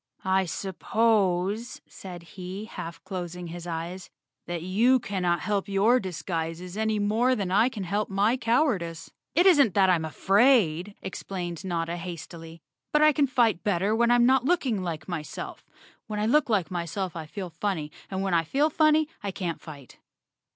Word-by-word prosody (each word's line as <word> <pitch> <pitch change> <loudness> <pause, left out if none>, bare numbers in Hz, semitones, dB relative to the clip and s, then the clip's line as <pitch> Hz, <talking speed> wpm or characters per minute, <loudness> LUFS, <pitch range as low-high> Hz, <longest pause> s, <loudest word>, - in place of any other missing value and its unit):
"I 190 0 +2
suppose," 200 +3 0
said 180 -3 -10
he, 185 +4 -7
half 165 -6 -8
closing 180 -2 -5
his 175 +1 -7
eyes, 170 +2 -5 0.4
"that 175 -1 -4
you 230 +8 +3
cannot 180 -6 -1
help 205 -2 -1
your 210 +6 +4
disguises 175 -1 -4
any 220 0 0
more 220 +5 +2
than 195 -5 -2
I 220 +6 +4
can 215 -6 -6
help 205 +4 -1
my 205 +5 +2
cowardice." 230 - 0 0.2
"It 350 - +4
isn't 285 - +5
that 190 -2 +5
I - - +5
am 160 - -2
afraid," 195 - +3
explained 180 -2 -5
Notta 170 -2 -2
hastily, 165 -1 -8 0.3
"but 300 0 +4
I 305 0 +6
can 285 0 +2
fight 235 -7 +2
better 205 +1 +1
when 235 +1 +3
I'm 240 0 +5
not 260 0 +4
looking 265 - +1
like 160 -5 -5
myself. 165 -4 -6 0.4
When 210 -1 -3
I 210 - +1
look 290 +4 +3
like 195 -5 +1
myself 175 +1 -3
I 160 -2 -6
feel 185 +1 -6
funny 160 -6 -3 0.2
and 190 0 -2
when 190 -2 -1
I 165 -1 +3
feel 285 - +1
funny, 310 0 +4
I 205 - -3
can't 180 -3 -4
fight." 145 -5 -12
190 Hz, 170 wpm, -27 LUFS, 175-225 Hz, 0.4 s, I